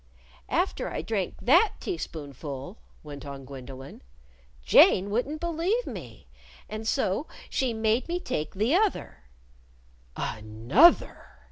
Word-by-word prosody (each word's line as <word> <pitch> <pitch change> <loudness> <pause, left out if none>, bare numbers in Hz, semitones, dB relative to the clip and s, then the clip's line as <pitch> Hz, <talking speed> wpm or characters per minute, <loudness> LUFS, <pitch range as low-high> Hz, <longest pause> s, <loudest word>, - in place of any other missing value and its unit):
"After - - 0
I - - -4
drank 195 0 -2
that 345 - +5
teaspoonful," 145 - -6 0.2
went 145 -2 -9
on 140 -2 -8
Gwendolyn, 135 0 -10 0.6
"Jane 195 - +6
wouldn't 275 +8 -1
believe 340 +8 0
me. - - -9 0.4
And 215 +1 -6
so 205 +7 0 0.2
she 260 -2 0
made 220 +2 0
me 350 +1 -1
take 155 - -4
the 215 +8 +1
other." 395 - 0
215 Hz, 105 wpm, -27 LUFS, -, 0.6 s, Jane